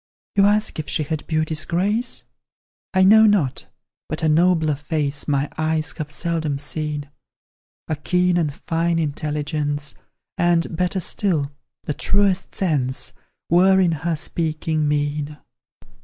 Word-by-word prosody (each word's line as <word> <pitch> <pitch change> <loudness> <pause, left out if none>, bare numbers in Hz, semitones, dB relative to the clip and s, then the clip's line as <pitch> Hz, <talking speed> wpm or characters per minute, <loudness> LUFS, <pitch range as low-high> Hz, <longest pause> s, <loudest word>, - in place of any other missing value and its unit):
You 200 0 +5
ask 210 -4 +1
if 155 - -4
she 155 - +1
had 155 0 -4
beauty's 155 -1 0
grace? 205 +8 -1 0.7
I 190 -1 +4
know 220 +3 +7
not 180 -11 +1 0.4
but 155 +1 -4
a - - +3
nobler 160 -1 +3
face 145 0 -2
My 140 -1 +1
eyes 155 -1 0
have 150 -1 -3
seldom 160 -2 -2
seen; 150 0 -4 0.8
A 155 - -1
keen 180 +4 +1
and 165 -4 +1
fine 165 +3 -1
intelligence, 150 -1 -2 0.5
And, 170 -1 +2
better 180 +3 0
still, 165 -5 0 0.3
the 150 - -2
truest 195 +2 +1
sense 140 -8 -1 0.3
Were 190 +3 +5
in 180 -3 +3
her 165 +2 -1
speaking 155 -1 -1
mien. 145 0 -1
160 Hz, 130 wpm, -22 LUFS, 150-180 Hz, 0.8 s, know